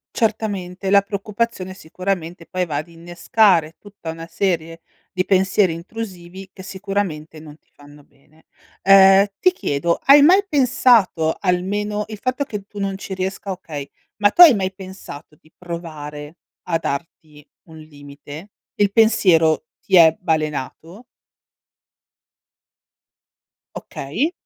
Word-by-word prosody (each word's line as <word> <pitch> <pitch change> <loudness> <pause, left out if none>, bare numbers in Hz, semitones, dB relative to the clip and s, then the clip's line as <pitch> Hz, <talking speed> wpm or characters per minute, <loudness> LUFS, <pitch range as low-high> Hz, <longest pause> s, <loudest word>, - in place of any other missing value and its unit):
Certamente, 200 -4 -2
la 200 0 +6
preoccupazione 200 -1 -4
sicuramente 175 -1 -5
poi 180 -1 -3
va 150 - -4
ad 155 +4 -3
innescare 170 0 +1
tutta 200 -5 -9
una 165 0 -9
serie 165 -2 -2 0.3
di 185 0 -2
pensieri 190 -2 +2
intrusivi, 185 0 -9
che 190 - -12
sicuramente, 190 -5 -5
non 150 -1 -13
ti - - -47
fanno 145 0 -17
bene. 155 +4 -28 0.4
Uhm, 195 0 +7
ti 365 - +4
chiedo: 170 - -2
hai 280 +1 +7
mai 375 +7 +5
pensato 235 - +2
almeno 205 +3 -1
il 215 -1 -8
fatto 255 +2 -2
che 210 -7 -6
tu 205 - -15
non 195 -1 -2
ci 190 0 -7
riesca 190 +1 -5
okay, 155 -6 -7 0.3
ma 205 -1 +3
tu 350 - +3
hai 320 -7 +10
mai 190 -2 -2
pensato 185 -6 -11
di 155 +1 -27
provare 155 -3 -8 0.3
a 165 -2 +1
darti 150 0 -7 0.3
un 160 0 -13
limite? 145 +3 -12 0.3
Il 205 -1 +1
pensiero 185 -9 +3 0.2
ti 190 - 0
è 160 -2 +7
balenato? 160 - -4 2.7
Okay. 225 - -4
185 Hz, 130 wpm, -20 LUFS, 160-205 Hz, 2.7 s, hai